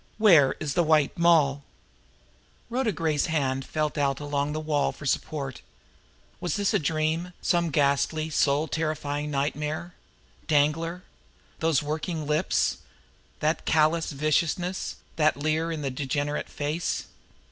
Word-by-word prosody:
Where 170 -11 +6
is 150 -3 -2
the 175 - +3
White 155 -3 +3
Moll?" 155 -5 +4 1.1
Rhoda 245 -2 +1
Gray's 160 -5 0
hand 135 -4 0
felt 155 +1 -2
Out 140 -1 +1
along 145 0 -1
the 155 - -2
wall 150 -2 0
for 150 - -11
support. 135 -1 -2 0.8
Was 175 - -2
this 205 -2 +1
a - - +3
dream, 160 +3 -1
some 170 -2 +1
ghastly, 150 +2 +1
soul 150 +1 +2
terrifying 150 -2 -2
nightmare! 150 +4 -2 0.5
Danglar! 165 +4 +1 0.6
Those 160 -3 +2
working 155 +1 -3
lips! 155 +5 +1 0.6
That 155 +1 0
callous 160 +1 +2
viciousness, 160 +5 0 0.2
that 155 -2 +3
leer 155 +3 0
in 155 -2 -4
the 135 - -1
degenerate 145 +2 -2
face. 150 +4 -2
155 Hz, 125 wpm, -26 LUFS, 145-165 Hz, 1.1 s, Where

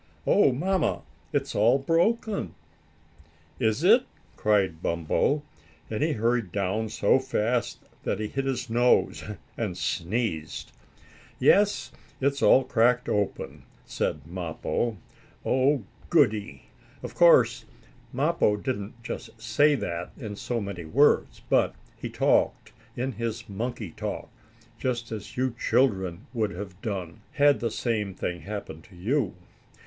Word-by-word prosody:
Oh, 195 -9 +5
Mamma, 180 +7 0 0.3
it's - - -1
all 115 +5 +4
broken." 195 - 0 1.0
"Is 110 +4 +1
it?" 230 +7 +6 0.3
cried 95 -6 +1
Bumpo, 85 - +1 0.5
and 110 - -2
he 155 +1 +2
hurried 115 -4 0
down 100 +3 -1
so 115 - +3
fast 120 -2 -1 0.2
that - - -2
he 110 - -2
hit 135 +5 -3
his 130 -2 -2
nose, 120 +2 +2 0.3
and 105 -6 -3
sneezed. 85 -5 -2 0.7
"Yes, 165 -11 +3 0.3
it's 140 +1 0
all 130 - +6
cracked 125 -1 +2
open," 105 -1 -2 0.2
said 75 -2 -2
Mappo. 90 +6 -2 0.5
"Oh, 130 0 +2 0.3
goodie!" 110 -11 +2 0.4
Of - - -6
course - - +5 0.5
Mappo 135 -6 +2
didn't 115 -1 -5
just 115 -1 -7
say 120 +7 +3
that 90 -7 -4
in 110 -7 -6
so 120 +3 -2
many 100 -4 -5
words, 135 - +2
but - - +2 0.2
he - - -6
talked, - - +1 0.2
in 130 +2 -2
his 115 -1 -4
monkey 110 -2 -4
talk, - - -5 0.5
just 120 -3 -2
as 110 +1 -7
you 130 -1 +1
children 95 -6 +1
would 110 -4 0
have 95 0 -8
done, 95 -5 -4
had 145 -1 +4
the 115 - -1
same 105 -4 -2
thing 90 -1 -3
happened 100 -6 -7
to 100 - -17
you. 110 +3 0
115 Hz, 125 wpm, -27 LUFS, 100-135 Hz, 1.0 s, it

